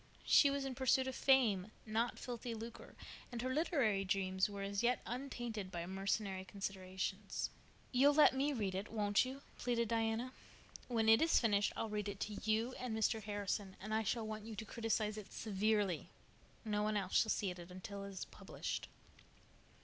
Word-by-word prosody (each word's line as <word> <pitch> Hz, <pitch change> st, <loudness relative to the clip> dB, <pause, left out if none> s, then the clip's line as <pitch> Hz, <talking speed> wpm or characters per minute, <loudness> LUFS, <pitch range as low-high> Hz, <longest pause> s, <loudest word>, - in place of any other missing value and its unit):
She 285 Hz, -, +7 dB
was 275 Hz, 0 st, -1 dB
in 270 Hz, -, -2 dB
pursuit 260 Hz, +1 st, +3 dB
of 260 Hz, -, -3 dB
fame, 220 Hz, -10 st, +4 dB, 0.2 s
not 225 Hz, +2 st, 0 dB
filthy 240 Hz, -1 st, -5 dB
lucre, 230 Hz, +1 st, -8 dB, 0.4 s
and 240 Hz, -, -4 dB
her 260 Hz, 0 st, 0 dB
literary 260 Hz, -, +2 dB
dreams 190 Hz, 0 st, +1 dB
were 200 Hz, -1 st, -5 dB
as 200 Hz, 0 st, -1 dB
yet 245 Hz, +1 st, +3 dB
untainted 240 Hz, -5 st, -4 dB
by 170 Hz, -1 st, -3 dB
mercenary 195 Hz, +1 st, -1 dB
considerations. 190 Hz, 0 st, -3 dB, 0.4 s
"You'll 280 Hz, +3 st, +5 dB
let 300 Hz, -, +7 dB
me 275 Hz, +3 st, +1 dB
read 210 Hz, -8 st, -1 dB
it, 195 Hz, +3 st, -4 dB
won't 205 Hz, 0 st, +3 dB
you?" 270 Hz, +2 st, -7 dB, 0.2 s
pleaded 235 Hz, -2 st, 0 dB
Diana. 225 Hz, +2 st, 0 dB, 0.6 s
"When 225 Hz, -3 st, +1 dB
it 225 Hz, +1 st, +7 dB
is 325 Hz, +1 st, +5 dB
finished 205 Hz, -3 st, +3 dB
I'll 225 Hz, -, -1 dB
read 210 Hz, -1 st, -2 dB
it 200 Hz, -1 st, -6 dB
to 210 Hz, -, -2 dB
you 225 Hz, +3 st, +1 dB
and 245 Hz, -3 st, -2 dB
Mr. 220 Hz, 0 st, +2 dB
Harrison, 205 Hz, -1 st, -3 dB
and 215 Hz, +4 st, -5 dB
I 220 Hz, -, +3 dB
shall 220 Hz, +2 st, -1 dB
want 215 Hz, -1 st, -5 dB
you 220 Hz, 0 st, -7 dB
to 220 Hz, +2 st, -5 dB
criticize 220 Hz, -2 st, -1 dB
it 210 Hz, -, -11 dB
severely. 205 Hz, -4 st, 0 dB, 0.6 s
No 210 Hz, -1 st, 0 dB
one 210 Hz, 0 st, +1 dB
else 190 Hz, -2 st, +3 dB
shall 220 Hz, -, -1 dB
see 200 Hz, -4 st, +1 dB
it 180 Hz, -, -8 dB
until 185 Hz, +3 st, -7 dB
it 200 Hz, -, -6 dB
is 190 Hz, -2 st, -5 dB
published." -, -, -5 dB
215 Hz, 180 wpm, -37 LUFS, 200-240 Hz, 0.6 s, She